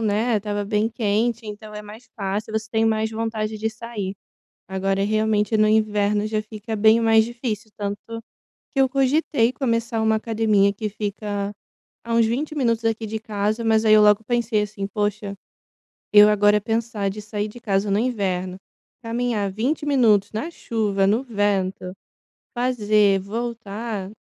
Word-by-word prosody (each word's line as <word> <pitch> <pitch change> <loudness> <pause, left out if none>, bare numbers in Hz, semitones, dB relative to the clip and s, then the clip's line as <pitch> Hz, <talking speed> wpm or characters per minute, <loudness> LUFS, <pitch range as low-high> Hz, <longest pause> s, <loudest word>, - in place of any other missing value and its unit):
né, 220 +2 +1
estava 205 0 -2
bem 210 +1 +1
quente, 225 +1 -1
então 210 0 -8
é 210 - -6
mais 215 +4 -12
fácil, 205 +2 -3
você 220 0 -2
tem 225 0 +1
mais 220 0 +1
vontade 220 -1 -3
de 220 +1 -1
sair. 220 -3 -6 0.5
Agora 195 +1 -1
realmente, 215 0 +1
no 215 0 +4
inverno 210 -1 +2
já 215 0 -1
fica 215 +1 -6
bem 220 +2 +5
mais 225 -1 +5
difícil, 230 -3 -5
tanto 205 +3 -5 0.5
que 275 - -2
eu 265 - +4
cogitei 270 -2 +2
começar 230 -3 -1
uma 220 0 +3
academia 215 -3 +2
que 210 +1 -4
fica 205 -1 -4 0.5
há 230 0 -4
uns 230 -1 +4
20 285 +7 -2
minutos 230 -4 0
aqui 225 -1 -1
de 220 +1 -4
casa, 215 +1 -2
mas 220 0 +3
aí 215 - +6
eu 215 - +6
logo 210 +1 +5
pensei 235 -2 0
assim: 205 -1 -4
"Poxa, 205 -1 -2 0.8
eu 210 0 +9
agora 210 0 +4
pensar 225 -2 -1
de 210 +2 -6
sair 210 0 -3
de 225 +3 -11
casa 200 -2 0
no 200 - +2
inverno, 190 -6 -1 0.5
caminhar 230 -3 -1
20 265 +9 -1
minutos 225 -8 +3
na 310 +11 -3
chuva, 205 -8 0
no 225 +6 +2
vento, 200 -5 -1 0.6
fazer, 210 -5 +2
voltar", 220 -1 -5
215 Hz, 160 wpm, -23 LUFS, 205-230 Hz, 0.8 s, eu